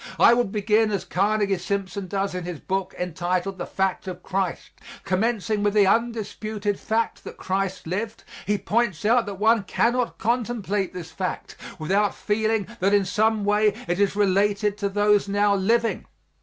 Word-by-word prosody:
I - - +7
would 240 -4 +1
begin 215 +1 +2
as 200 -4 -2
Carnegie 200 0 +1
Simpson 195 0 -3
does 195 +1 -2
in 180 -1 -4
his 175 -3 -6
book 190 -1 -3
entitled, 180 +2 -2
"The 175 - -4
Fact 190 0 -1
of 180 -1 -6
Christ." 190 -2 -2 0.3
Commencing 210 +2 0
with 205 0 +1
the 205 -2 +6
undisputed 215 -2 -1
fact 225 +1 -1
that - - -9
Christ 190 0 -2
lived, 210 +6 -4 0.2
he 205 0 +2
points 210 -6 -1
out 230 +1 +3
that 200 - -4
one 220 +3 +3
cannot 240 +5 0
contemplate 220 -4 -1
this 170 -2 -7
fact 185 +2 -4 0.2
without 195 +5 +1
feeling 220 0 0
that 200 0 +3
in 200 -1 +3
some 215 +1 +1
way 210 0 +3
it 175 +2 -1
is 200 -1 +2
related 205 +1 +2
to 200 -1 0
those 205 0 +3
now 205 0 +2
living. 225 +4 +1
205 Hz, 165 wpm, -24 LUFS, 190-215 Hz, 0.3 s, I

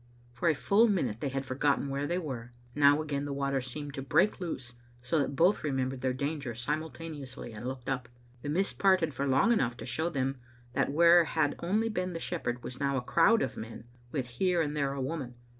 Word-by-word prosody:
For 125 +8 +1
a 160 - +3
full 210 - +4
minute 130 - 0
they 140 - -1
had 135 0 -3
forgotten 140 +2 +1
where 140 +1 -2
they 175 - 0
were. 125 -8 -5 0.2
Now, 145 +1 +5
again, 145 -2 -2
the 145 - -3
water 140 -1 0
seemed 140 +3 -5
to 135 - -4
break 140 +11 +2
loose, 130 -8 -4 0.3
so 140 +6 +1
that 140 0 -1
both 175 +8 +3
remembered 130 -3 -1
their 130 0 +1
danger 140 -2 -3
simultaneously 150 -1 -5
and 110 +3 -6
looked 130 -1 -6
up. 125 -3 -2 0.3
The 145 - -4
mist 190 +6 0
parted 185 -6 +3
for 140 +3 -2
long 140 - +4
enough 120 - +1
to - - -7
show 155 +7 -1
them 135 -3 -1 0.4
that - - +1
where 170 +2 +6
had 155 -2 +1
only 210 +6 +1
been 185 -4 -2
the 165 - -4
shepherd 125 -9 -3
was 125 - -7
now 140 -1 +1
a - - 0
crowd 185 - +4
of - - -3
men, 115 +1 -8 0.3
with 135 -4 -1
here 175 +9 0
and 150 -2 0
there 140 -2 0
a 140 - -5
woman. 130 -4 -4
140 Hz, 215 wpm, -30 LUFS, 130-165 Hz, 0.4 s, where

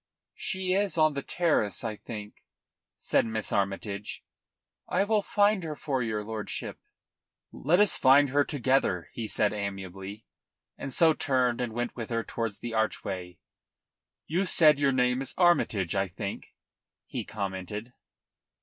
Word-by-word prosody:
"She 190 -1 -1
is 195 -3 +1
on 155 -1 +4
the 140 - -3
terrace, 140 - 0
I 110 -2 -2
think," 105 -1 -9 0.5
said - - +2
Miss 110 -1 -2
Armytage. 100 +1 -2 0.6
"I - - +2
will 210 0 +2
find 205 -2 +2
her 155 -2 -4
for 135 -3 -2
your 110 -2 -2
lordship." 110 0 -5 0.7
"Let 170 +6 +2
us 210 -1 +4
find 140 +2 +6
her 145 +2 +3
together," 130 - 0
he 115 -2 -4
said 105 0 +1
amiably, 95 0 -6 0.5
and 135 - -6
so 160 +3 +5
turned 125 -5 +1
and 120 -2 -2
went 120 +1 -3
with 115 -3 -5
her 115 -1 -1
towards 115 -3 -4
the 120 -1 -5
archway. 95 -5 -2 0.9
"You 180 +5 0
said 155 -5 +5
your 140 -1 +3
name 125 0 +2
is 135 - -3
Armytage, 115 - +3
I 95 0 +1
think?" 100 +2 -7 0.5
he - - -4
commented. 100 +3 -5
120 Hz, 145 wpm, -28 LUFS, 105-150 Hz, 0.9 s, find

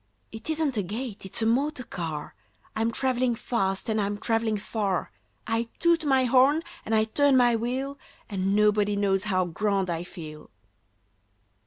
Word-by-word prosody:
"It 220 +6 -8
isn't 310 -5 0
a - - +2
gate; 210 +1 -5
it's 205 +4 -1
a - - +2
motor 265 +4 +1
car! 165 -8 -5 0.4
I'm 225 +1 +1
travelling 255 -1 +1
fast 195 -3 -1
and 220 -1 +1
I'm 205 0 -1
travelling 225 0 0
far. 200 -3 -2 0.3
I 225 +1 -1
toot 340 -1 +3
my 265 -2 +4
horn 265 +5 +4 0.2
and 225 - +1
I 215 - +4
turn 275 +5 +3
my 240 -2 +5
wheel, 260 +5 -3 0.3
And 195 -1 0
nobody 210 -1 +3
knows 200 -1 +1
how 185 -3 +1
grand 195 +1 0
I 165 0 -2
feel!" 155 -4 -10
220 Hz, 160 wpm, -27 LUFS, 195-255 Hz, 0.4 s, my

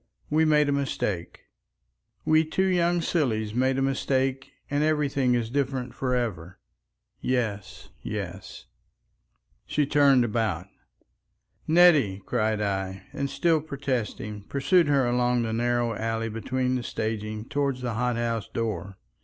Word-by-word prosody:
We 160 +1 +4
made 150 -1 +4
a - - +1
mistake. 105 -10 -2 0.8
We 155 0 +4
two 175 +4 0
young 175 -2 +2
sillies 110 - 0
made 130 +2 +1
a 135 - +1
mistake 135 0 0 0.2
and 145 +1 0
everything 140 -5 +2
is 115 -1 -2
different 130 -2 -1
for 125 -1 -1
ever. 95 -8 -3 0.6
Yes, 110 -6 -3
yes." - - -6 1.0
She 150 - +1
turned 140 -3 +4
about. 110 -6 -1 1.0
"Nettie!" 155 - +5
cried 110 -3 0
I, 95 -1 -2
and 140 0 -2
still 160 +3 +2
protesting, 125 -8 -3
pursued 165 +5 +3
her 140 -3 +3
along 120 0 +1
the 110 -1 -2
narrow 120 0 +1
alley 115 +1 -2
between 125 +4 -1
the 125 - 0
staging 110 -1 -4
toward 140 -1 -1
the 125 -2 -3
hot 125 +1 0
house 115 -2 -2
door. 105 -4 -3
125 Hz, 130 wpm, -26 LUFS, 110-140 Hz, 1.0 s, Nettie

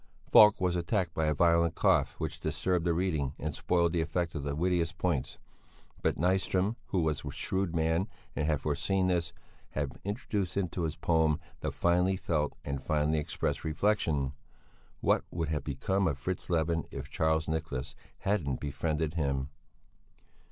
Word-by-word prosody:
Falk 105 -1 +7
was 90 -1 +1
attacked 90 0 0
by 80 -1 0
a 75 - +3
violent 85 +1 +3
cough - - +3
which - - -3
disturbed 90 -2 0
the 85 - +3
reading 80 -7 0
and 75 0 -3
spoiled 85 +2 +1
the 85 - +2
effect 85 +1 -1
of 75 - -3
the 70 0 -3
wittiest 85 +1 0
points; 85 -8 -1 0.6
but - - +1
Nyström, 95 +4 +1
who 95 - +1
was 80 -2 0
a 70 - -4
shrewd 95 +4 -2
man 80 +4 +1 0.3
and 75 - 0
had 75 -3 +1
foreseen 95 +6 +1
this, 85 -2 0 0.4
had 70 -2 -3
introduced 100 -3 -2
into 90 -3 -1
his 80 - -3
poem 80 -2 +2 0.2
the - - -2
finely 90 +2 +2
felt 75 -5 0
and 70 -1 -3
finely 75 +2 +1
expressed 75 - -2
reflection: 80 -5 +1 0.7
"What - - +3
would 80 -2 -2
have 75 -2 -1
become 95 +8 0
of 75 -5 -1
Fritz 90 +8 -4
Levin 80 -2 +1
if - - -7
Charles 80 0 +1
Nicholas 75 -4 -3 0.3
hadn't 85 -10 0
befriended 75 +2 -1
him?" 70 -4 -1
80 Hz, 160 wpm, -30 LUFS, 75-90 Hz, 0.7 s, Falk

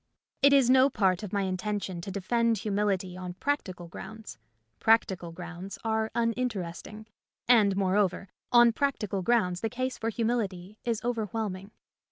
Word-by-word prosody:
It 280 0 +6
is 275 -3 +5
no 260 +2 +6
part 190 -7 +1
of 210 -3 -6
my 200 -1 0
intention 190 -1 -3
to 185 - -7
defend 230 +4 +1
humility 195 -3 -1
on 180 -1 -6
practical 185 -9 -3
grounds. 220 +5 -9 0.4
Practical 190 -6 +2
grounds 175 +2 -8
are 220 -1 0
uninteresting, 220 -4 -2 0.4
and, 210 -5 +5
moreover, 195 0 +1 0.2
on 240 -1 +6
practical 220 -8 -1
grounds 180 -4 +1
the 225 - -1
case 255 +2 -3
for 225 - -1
humility 215 -4 -2
is 230 -2 -2
overwhelming. 215 -4 -3
210 Hz, 140 wpm, -28 LUFS, 185-230 Hz, 0.4 s, It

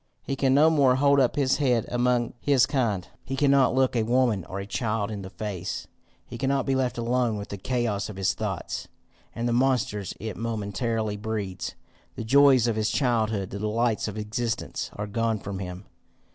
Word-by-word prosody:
He 135 - -2
can 135 -1 +2
no 155 +3 +6
more 140 -5 +4
hold 140 +1 +4
up 130 -3 +2
his 135 -2 +2
head 125 -6 +2
among 120 -1 +1
his 140 -4 +4
kind; 110 -9 -1 0.2
he 135 - -4
cannot 135 -2 +4
look 130 -1 +2
a 115 - +3
woman 120 -4 +2
or 95 - -6
a 100 - -5
child 110 -1 -2
in 105 -2 -5
the 95 - -7
face; 95 -4 -5 0.4
he 120 - -9
cannot 135 +1 +1
be 135 - +1
left 130 -2 0
alone 120 -1 0
with 100 - -6
the 100 - -5
chaos 115 -3 -1
of 105 - -7
his 95 -1 +1
thoughts, - - -4 0.5
and 120 +1 -1
the 120 - +1
monsters 120 -6 0
it 110 -3 -5
momently 110 -1 -2
breeds. 105 -3 -4 0.4
The - - -4
joys 135 0 +5
of 115 -2 +1
his 110 0 +1
childhood, 110 -7 0
the 100 - -5
delights 110 +2 0
of 105 0 -5
existence, 110 +2 -3
are 105 - -4
gone 115 +1 0
from 100 -1 -6
him. 90 0 -7
115 Hz, 190 wpm, -26 LUFS, 105-130 Hz, 0.5 s, no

